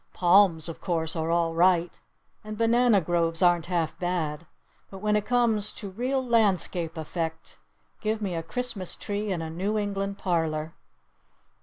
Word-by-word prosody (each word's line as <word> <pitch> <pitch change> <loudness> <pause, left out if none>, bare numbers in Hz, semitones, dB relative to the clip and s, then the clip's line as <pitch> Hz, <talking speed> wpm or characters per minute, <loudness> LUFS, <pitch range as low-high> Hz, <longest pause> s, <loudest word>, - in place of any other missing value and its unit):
Palms, 175 -3 +4
of 165 - -8
course, 165 -2 -1
are 160 0 -2
all 170 -1 +1
right, 175 0 +2 0.4
and 215 0 -7
banana 230 -1 +4
groves 165 0 0
aren't 175 -2 +3
half 170 -3 -1
bad! 165 -3 -2 0.4
But 195 - -9
when 210 +2 0
it 210 -1 -1
comes 225 -4 +2
to 200 -3 -7
real 255 +6 -1
landscape 185 -7 +1
effect 160 +1 -5 0.4
give 220 0 -1
me 200 -4 -3
a 165 - -2
Christmas 225 0 -4
tree 205 0 -3
in 170 -3 -2
a 160 - -5
New 195 +6 -1
England 200 -1 -2
parlor!" 160 -4 -1
185 Hz, 155 wpm, -26 LUFS, 165-210 Hz, 0.4 s, Palms